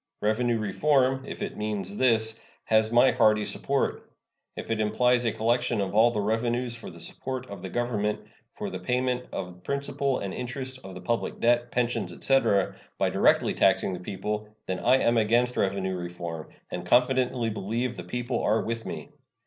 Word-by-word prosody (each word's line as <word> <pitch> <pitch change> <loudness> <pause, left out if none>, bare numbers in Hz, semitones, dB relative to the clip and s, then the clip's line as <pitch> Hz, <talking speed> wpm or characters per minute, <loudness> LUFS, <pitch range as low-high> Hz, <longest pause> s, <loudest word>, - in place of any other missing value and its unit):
Revenue 115 +3 +1
reform, 130 +5 +2
if - - -5
it - - -5
means 105 -1 -3
this, 110 -3 +2 0.2
has 110 0 +2
my 120 +2 +6
hearty 110 -3 +3
support. - - -1 0.5
If - - -6
it 110 - 0
implies 120 +3 +2
a 115 - +2
collection 120 +2 +1
of 100 -1 -1
all 110 +3 +6
the 115 -3 -2
revenue 120 +4 0
for 115 -1 -4
the - - -12
support 130 -1 -5
of 100 -3 -7
the 95 - -6
Government, 105 -2 -1 0.4
for - - -4
the 95 - -5
payment 125 +5 -1
of 90 -1 -6
principal 140 -1 -1
and 100 -1 -4
interest 130 +1 -4
of 95 -1 -9
the 90 - -8
public 115 -1 -2
debt, 120 +1 +2
pensions, 120 0 -1
etc., 120 -8 +2 0.2
by - - +1
directly - - +3
taxing 95 - +3
the 90 - -5
people, 105 +3 -4 0.2
then 95 - -3
I 130 - +4
am 120 -2 +2
against 120 +3 +2
revenue 95 -1 0
reform, 85 -2 -6 0.2
and - - -4
confidently 125 -2 +2
believe 115 +5 -2
the - - -7
people 120 0 -2
are 110 +2 +2
with 115 0 -4
me. - - -6
115 Hz, 175 wpm, -27 LUFS, 105-125 Hz, 0.5 s, my